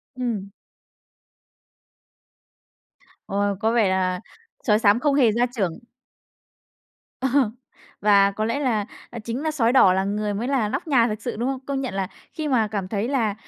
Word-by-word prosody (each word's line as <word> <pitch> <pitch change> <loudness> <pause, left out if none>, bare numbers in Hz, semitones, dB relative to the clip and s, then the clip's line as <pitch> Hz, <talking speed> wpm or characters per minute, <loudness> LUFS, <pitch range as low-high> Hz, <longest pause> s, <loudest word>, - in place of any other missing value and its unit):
Ừm. 230 -6 -3 2.8
Ôi. 200 0 0
Có 225 +2 +1
vẻ 220 -5 +3
là 185 0 0 0.4
sói 210 -3 +3
xám 210 0 +4
không 290 +2 +2
hề 260 -6 +4
gia 235 +3 +2
trưởng. 190 -6 -1 1.4
Ờ. 265 - +1 0.7
Và 200 -1 +5
có 215 +2 -3
lẽ 230 +5 -1
là 225 -7 +1 0.4
chính 235 +4 -3
là 315 - 0
sói 245 -6 +2
đỏ 225 -8 +6
là 190 +1 +1
người 205 +1 -2
mới 230 +5 -2
là 260 -6 +1
nóc 210 - -3
nhà 245 -5 +4
thật 215 - -1
sự, - - -4
đúng 240 +4 -1
không? 270 -1 -3
Công 275 -1 -2
nhận 255 -7 -4
là 195 -1 -1 0.3
khi 310 -1 -3
mà 235 -6 +2
cảm 195 -3 -3
thấy 210 +2 -2
là 235 -7 0
220 Hz, 170 wpm, -23 LUFS, 200-255 Hz, 2.8 s, đỏ